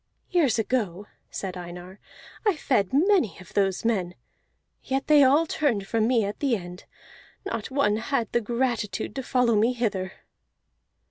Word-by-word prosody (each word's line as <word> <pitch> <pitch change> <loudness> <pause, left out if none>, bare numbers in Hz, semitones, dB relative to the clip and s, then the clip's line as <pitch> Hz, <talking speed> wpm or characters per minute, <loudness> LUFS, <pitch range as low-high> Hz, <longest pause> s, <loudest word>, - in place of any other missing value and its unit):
"Years 295 -11 +3
long," 205 -6 -1 0.2
said 190 -2 -5
Einar, 180 +2 -9 0.4
"I 415 -5 +2
fed 230 -10 +1
many 325 - +3
of 185 - -14
those 195 0 0
men, 185 -6 0 0.7
yet 270 0 -1
they 300 -2 +6
all 285 +5 +5
turned 265 -11 0
from 220 +2 +1
me 235 -4 +2
at 205 - -5
the 270 -5 +2
end. 180 -2 -8 0.6
Not 230 - -4
one 260 -6 +2
had 235 0 -1
the 240 - +1
gratitude 235 -2 -2
to 270 - -3
follow 250 -2 +2
me 225 +4 +3
hither." 200 -6 -2
230 Hz, 150 wpm, -26 LUFS, 195-265 Hz, 0.7 s, they